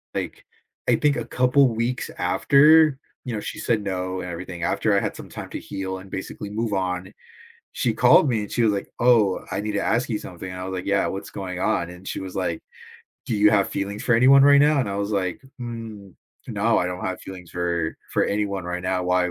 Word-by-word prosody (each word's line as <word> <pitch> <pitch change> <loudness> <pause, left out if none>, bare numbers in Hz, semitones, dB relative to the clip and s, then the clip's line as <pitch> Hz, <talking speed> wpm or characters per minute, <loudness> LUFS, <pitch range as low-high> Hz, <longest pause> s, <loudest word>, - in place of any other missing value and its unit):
like, - - -5 0.4
I - - +5
think 145 -1 +2
a - - -3
couple 130 +2 +3
weeks 120 +3 -2
after- 150 +1 +5 0.3
you 125 - -4
know, 105 - -2
she - - -6
said 115 -3 0
no 95 -1 -3
and 90 - -6
everything- 85 0 -6
after - - +1
I - - +4
had - - -3
some - - -10
time - - -8
to - - -4
heal 95 -1 -5
and 95 - -13
basically 95 +2 -6
move 110 +1 -2
on, 95 -1 -2 0.6
she - - 0
called 145 - +6
me, 115 -3 +1
and 105 - -7
she 120 - +1
was 110 -2 +4
like, 100 -1 -3
"Oh, 115 -6 +3
I - - -2
need 105 0 -3
to 100 - 0
ask 120 +2 +1
you 105 - 0
something," 90 -1 -8
and 90 - -7
I - - -4
was 95 - -5
like, 90 - -5
"Yeah, 100 - +2
what's 95 +1 -5
going 90 -2 -5
on?" 85 -2 0
and 90 +2 -13
she - - -4
was 95 -1 -7
like, 90 -4 -2 0.6
"Do 115 - -1
you 105 +1 +5
have 100 -2 +3
feelings 100 +1 -4
for 120 - +3
anyone 135 +4 +7
right 140 0 +7
now?" 150 0 +4
and 115 - -2
I 100 - -3
was 100 +1 -2
like, 95 -3 -1 0.2
"N 110 -5 -8 0.3
No, - - +1
I 90 - 0
don't 90 0 -5
have 95 -1 -3
feelings 90 -3 -10
for 85 -2 -2 0.2
for - - +2
anyone 100 -2 -1
right 90 +1 -4
now, 90 0 -1
why 90 0 +2
100 Hz, 235 wpm, -23 LUFS, 90-115 Hz, 0.6 s, anyone